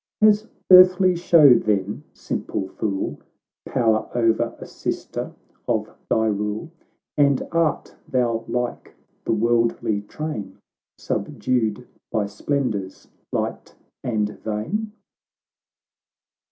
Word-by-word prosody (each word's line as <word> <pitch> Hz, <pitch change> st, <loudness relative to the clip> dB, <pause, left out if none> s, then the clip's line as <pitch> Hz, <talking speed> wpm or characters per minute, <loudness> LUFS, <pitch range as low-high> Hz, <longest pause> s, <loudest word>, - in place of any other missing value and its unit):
— -, -, -70 dB
" -, -, -68 dB
Has 215 Hz, 0 st, +5 dB, 0.2 s
earthly 185 Hz, 0 st, +8 dB
show 165 Hz, -5 st, +7 dB
then, 105 Hz, -3 st, 0 dB
simple 95 Hz, -, -4 dB
fool, 95 Hz, 0 st, -3 dB, 0.5 s
Power 110 Hz, -4 st, +1 dB
o'er 115 Hz, -2 st, +1 dB
a -, -, -8 dB
sister -, -, -4 dB, 0.4 s
of -, -, -1 dB
thy 110 Hz, -, +2 dB
rule, 105 Hz, +7 st, -2 dB, 0.5 s
And 140 Hz, -2 st, +3 dB
art 165 Hz, -3 st, 0 dB, 0.2 s
thou 120 Hz, -3 st, +1 dB
like 125 Hz, -1 st, -3 dB, 0.3 s
the -, -, +1 dB
worldly 115 Hz, -2 st, +1 dB
train, 105 Hz, -5 st, -6 dB, 0.4 s
Subdued 120 Hz, -2 st, -1 dB, 0.3 s
by 105 Hz, -2 st, +1 dB
splendours 105 Hz, -3 st, -3 dB, 0.2 s
light -, -, -3 dB, 0.3 s
and 110 Hz, -3 st, 0 dB, 0.2 s
vain 140 Hz, -, -2 dB
115 Hz, 100 wpm, -23 LUFS, 105-150 Hz, 0.5 s, earthly